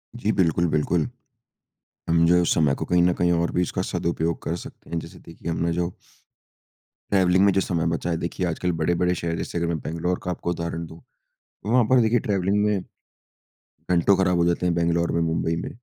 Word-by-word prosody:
जी। 110 -2 0
बिल्कुल, 85 -2 +2
बिल्कुल, 75 +1 0 1.0
हम 85 0 +4
जो 85 - +5
है 90 - +5
उस - - +2
समय 75 -4 +3
को - - -4
कहीं 90 0 +2
न 90 0 +4
कहीं 85 0 +1
और 85 0 +1
भी 90 - +1
उसका - - -2
सदुपयोग 85 -1 -2
कर 85 - -2
सकते - - -12
हैं। 85 - -1
जैसे 80 - -9
कि - - -20
देखिए 85 - -6
हमने 85 +1 -1
जो 85 0 -1 1.2
ट्रैवलिंग 95 0 +4
में 100 - +5
जो 95 - +2
समय 85 -3 -1
बचा 85 - -4
है 85 - 0
देखिए 90 +2 -3
आजकल 90 +2 -1
बड़े-बड़े 90 +2 +1
शहर 85 0 -2
जैसे - - -4
अगर 85 0 0
मैं 85 -1 -1
बैंगलोर 85 +4 -2
का 90 - -2
आपको 85 - -4
उदाहरण 85 -1 -3
दूँ। 80 +1 -12 0.4
तो 110 - -8
वहाँ 125 -1 +5
पर 130 -2 +6
देखिए 115 +2 +3
ट्रैवलिंग 100 -2 0
में 100 -3 0 1.1
घंटों 90 +2 +4
ख़राब 90 -2 +2
हो 85 - +3
जाते 85 +1 0
हैं, 85 - +2
बैंगलोर 85 0 +1
में 85 - 0
मुंबई 80 0 0
में। - - -5
85 Hz, 215 wpm, -24 LUFS, 85-90 Hz, 1.2 s, पर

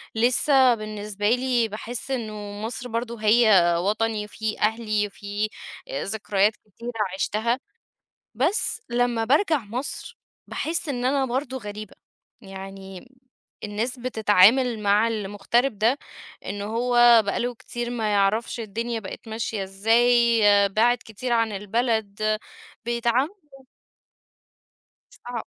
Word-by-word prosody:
لسه 255 +2 +4
بالنسبة 210 -1 -3
لي 245 -1 +2
باحس 230 +5 -6
إنه 215 -5 -4
مصر 240 +2 -5
برضه 230 0 -4
هي 220 +1 +5 0.3
وطني 215 +3 -1
وفيه 215 +1 -4
أهلي 215 -1 0
وفيه 205 +1 -4 0.4
ذكريات 210 - 0
كتيرة 230 +4 -9 0.2
عشتها. 225 +5 0 0.8
بس 330 - +1
لما 240 -1 +1
بارجع 310 - +3
مصر، 260 - -5 0.3
باحس 330 0 -2
إن 250 -3 -2
أنا 270 +1 +2
برضو 260 +1 -3
غريبة، 210 -3 -8 0.5
يعني 195 0 -10 0.6
الناس 220 +5 -3
بتتعامل 230 0 +4
مع 205 +2 +3
المغترب 215 +3 -1
ده، 230 +7 +2 0.5
إنه 200 0 -4
هو 240 +1 +5
بقى 200 - -1
له 245 +1 -2
كتير 240 +1 -6
ما 220 -3 -1
يعرفش 205 +4 +1
الدنيا 230 +2 -3
بقت 205 +3 -9
ماشية 220 -2 -3
إزاي، 230 +4 +3 0.3
بِعد 235 +5 +3
كتير 235 +3 -5
عن 230 -2 +2
البلد، 215 0 -1 0.5
بيتعاملوا 240 +6 0 1.8
صعب. 240 -2 -7
225 Hz, 110 wpm, -24 LUFS, 210-245 Hz, 1.8 s, هي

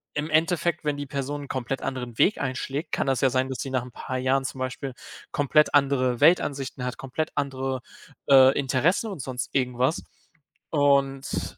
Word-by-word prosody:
im 150 +1 -2
Endeffekt, 165 +2 +1
wenn 150 -1 -1
die 145 - -4
Person 140 +1 -4
'n - - -9
komplett 130 0 -3
anderen 125 -3 -5
Weg 210 - +3
einschlägt, 135 +3 -3
kann - - 0
das 135 -2 +1
ja 135 - +4
sein, 130 +1 0
dass 130 - -5
sie 135 - -4
nach 130 -2 -1
ein 125 - -11
paar 130 +2 -5
Jahren 130 +1 +1
zum 135 0 -5
Beispiel 130 +1 -4 0.4
komplett 150 +2 +3
andere 130 -3 +2
Weltansichten 140 -6 +2
hat, 125 0 -3
komplett 135 +4 -3
andere, 135 -2 -2 0.5
äh, 135 -1 +7
Interessen 140 - +1
und 190 - -7
sonst 125 -1 -4
irgendwas 130 +2 0 0.7
und, 135 - +1
135 Hz, 175 wpm, -25 LUFS, 130-145 Hz, 0.7 s, äh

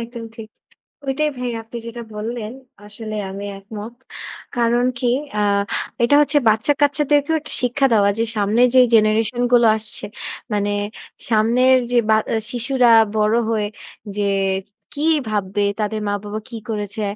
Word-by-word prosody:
একদম 230 0 -7
ঠিক। 220 -1 -9 0.6
ওইটাই 300 +3 0
ভাই 250 -1 -3
আপনি 225 +1 -9
যেটা 235 +1 -7
বললেন, 220 +1 -4 0.3
আসলে 215 +1 -7 0.2
আমি 200 +1 -6
একমত। 210 +3 -9 0.6
কারণ 240 +1 +2
কি 245 - +1 0.3
আ - - +2 0.6
এটা 285 +5 +4
হচ্ছে 290 0 +2
বাচ্চা-কাচ্চাদেরকেও 290 +5 +2
একটা 300 - -8
শিক্ষা 250 +3 +1
দেওয়া 200 -2 +4
যে - - +3
সামনের 215 +4 +3
যে 255 - +8
জেনারেশন 220 +2 +2
গুলো 235 -2 +6
আসছে, 215 0 -3 0.5
মানে 205 0 0 0.6
সামনের 235 +4 +4 0.2
যে 245 - +2
বা 215 - +5
অ্যা 225 - +1
শিশুরা 245 0 +2 0.3
বড় 215 +1 +2
হয়ে 215 -2 0 0.5
যে 205 - 0 0.7
কি 310 +2 +2 0.2
ভাববে, 205 -1 -1
তাদের 215 0 -2
মা-বাবা 205 +1 -3
কি 230 - -7
করেছে 210 0 -4
225 Hz, 140 wpm, -20 LUFS, 210-250 Hz, 0.7 s, যে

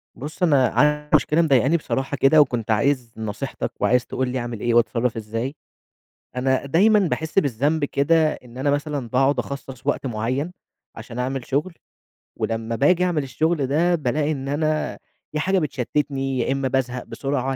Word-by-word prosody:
بُص، 150 +6 -6
أنا 140 -7 +4
عندي 150 0 +1
مشكلة 155 +3 +3
مضايقاني 140 0 +3
بصراحة 135 -2 -3
كده، 135 +3 +6
وكنت 120 -6 0
عايز 125 +1 +1
نصيحتك 110 -2 -4
وعايز 125 0 +2
تقول 130 -1 -2
لي 130 +1 -2
أعمل 120 -2 -5
إيه، 120 +2 0
وأتصرف 120 0 +2
إزاي. 115 +5 -4 0.8
أنا 130 +2 +1
دايمًا 205 +10 +4
باحس 160 -2 +1
بالذنب 145 - 0
كده 155 +3 +2
إن 125 0 -13
أنا 140 +2 +1
مثلًا 145 -3 -2
باقعد 135 +3 +2
أخصص 135 -2 -6
وقت 145 - 0
معين، 125 +8 -2 0.4
عشان 115 +2 -8
أعمل 130 0 -2
شغل، 150 +7 -1 0.6
ولمّا 115 0 -2
باجي 165 +9 +3
أعمل 175 -5 +1
الشغل 145 +2 0
ده، 170 +6 +2
بالاقي 145 0 0
إن 135 -3 -4
أنا 155 +2 -1 0.4
يا 150 - -1
حاجة 190 +3 +2
بتشتتني، 135 -2 -2
يا 120 - 0
إما 135 0 0
بازهق 125 -1 -1
بسرعة، 135 -1 -2
135 Hz, 160 wpm, -22 LUFS, 125-150 Hz, 0.8 s, كده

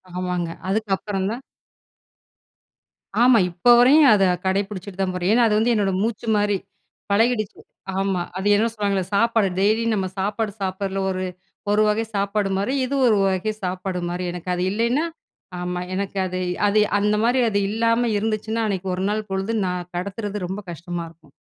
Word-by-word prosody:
ஆமாங்க. 180 -2 -2 0.2
அதுக்கப்புறம் 195 -1 -1
தான் 245 +4 -5 1.8
ஆமா. 250 -1 +6
இப்போ 175 +7 0
வரையும் 280 +4 +7
அத 200 - +4 0.2
கடைப்புடிச்சிட்டு 195 0 -2
தான் 185 -1 0
போறேன். 180 +2 0
ஏன்னா 240 +1 +4
அது 210 -1 +2
வந்து 235 +2 +2
என்னோட 200 -2 +1
மூச்சு 225 +1 -2
மாரி, 205 -1 +2 0.5
பழகிடுச்சு. 215 0 +1 0.4
ஆமா 195 -2 0 0.2
அது 190 +2 -2
என்ன 220 +3 +2
சொல்லுவாங்கள்ல, 200 -3 -1
சாப்பாடு 225 -2 +3
டெய்லியும் 220 +3 +2
நம்ம 190 -2 -1
சாப்பாடு 210 +2 -1
சாப்பிட்றதுல 195 0 -2
ஒரு 185 0 -2 0.5
ஒரு 210 +1 +3
வகை 210 +2 +1
சாப்பாடு 200 0 0
மாரி, 200 +7 -1
இது 280 +2 -2
ஒரு 225 -3 +5
வகை 190 +3 0
சாப்பாடு 185 0 -3
மாரி. 175 +1 -3
எனக்கு 180 +1 -7
அது 180 - -1
இல்லைனா 235 +9 +1 0.5
ஆமா 180 0 -3
எனக்கு 195 +1 -3
அது 185 0 -3 0.3
அது 205 +1 +3 0.2
அந்த 210 +1 +2
மாரி 245 +3 +3
அது 200 -1 +1
இல்லாம 230 +2 +1
இருந்துச்சுன்னா, 220 +1 -1
அன்னைக்கு 190 -2 -3
1 185 - -3
நாள் 215 0 -2
பொழுது 195 +3 -1
நான் 180 -1 -3
கடத்துறது 200 +1 -4
ரொம்ப 190 +3 -4
கஷ்டமா 175 +1 -5
இருக்கும் 160 -3 -22
200 Hz, 160 wpm, -22 LUFS, 185-220 Hz, 1.8 s, வரையும்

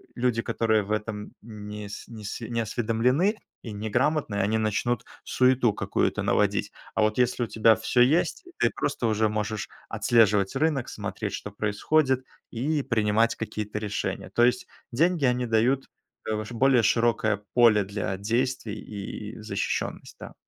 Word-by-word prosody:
люди, 120 -2 +1
которые 110 -2 +1
в 100 - -7
этом 105 -1 -3
нес 105 -1 -8
неси 110 +1 -7
не 115 -1 -1
осведомлены 120 - +1 0.2
и 115 - -7
неграмотны, 110 +4 0
они 100 +2 +1
начнут 110 +2 0 0.2
суету 125 -3 +3
какую-то - - -1
наводить. - - +1 0.2
А - - +2
вот 110 0 +1
если 125 0 +2
у - - -2
тебя 110 +1 +4
всё 115 +2 +1
есть, 155 - +2
ты - - +3
просто - - -2
уже 110 0 +2
можешь 105 0 -3 0.2
отслеживать 105 -2 +3
рынок, 140 -3 0
смотреть, - - -5
что 105 - -6
происходит, 130 +7 +1 0.3
и 145 +6 -1
принимать 110 -1 +2
какие-то 105 -1 -4
решения. 105 -1 -3
То 120 - +3
есть 120 +1 +2 0.2
деньги- 160 +4 +2
они 125 0 +1
дают, 120 +4 +2 0.4
э, - - +1
ваш 110 +2 -5
более 125 0 +3
широкое 110 -2 +2
поле 115 -4 +5
для 100 -1 -3
действий 115 +1 -1
и 105 +1 -7
защищённость, 105 -2 -3
да. - - -9
115 Hz, 145 wpm, -26 LUFS, 105-125 Hz, 0.4 s, поле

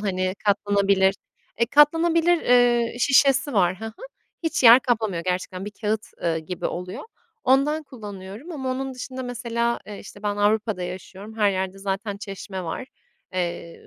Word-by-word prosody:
hani, 185 -2 -1
katlanabilir 200 -1 +3 0.5
Eee, 235 - +4
katlanabilir, 330 +5 +4
eee, 240 -1 +3
şişesi 275 +1 +4
var, 185 -3 +2
hı 225 - -6
hı. 220 0 -9 0.4
Hiç 325 -2 -1
yer 235 +2 +9
kaplamıyor 220 -8 -1
gerçekten. 185 +1 -3
Bir 210 - -5
kâğıt, 215 0 -1 0.2
ııı, 165 -1 +1
gibi 165 +3 -4
oluyor. 180 +2 -6 0.4
Ondan 280 +4 +3
kullanıyorum 210 - -9
ama 265 -4 -3
onun 265 +1 -3
dışında 260 +1 -6
mesela, 235 -1 -2
eee, 205 -1 -8
işte, 205 +1 -12
ben 205 -1 -1
Avrupa'da 210 -1 +1
yaşıyorum. 190 +4 -8
Her 210 -2 +3
yerde 190 0 -3
zaten 200 +1 -3
çeşme 195 -2 -7
var. 170 +10 -5 0.5
Eee, 175 -2 -4
210 Hz, 150 wpm, -24 LUFS, 190-250 Hz, 0.5 s, yer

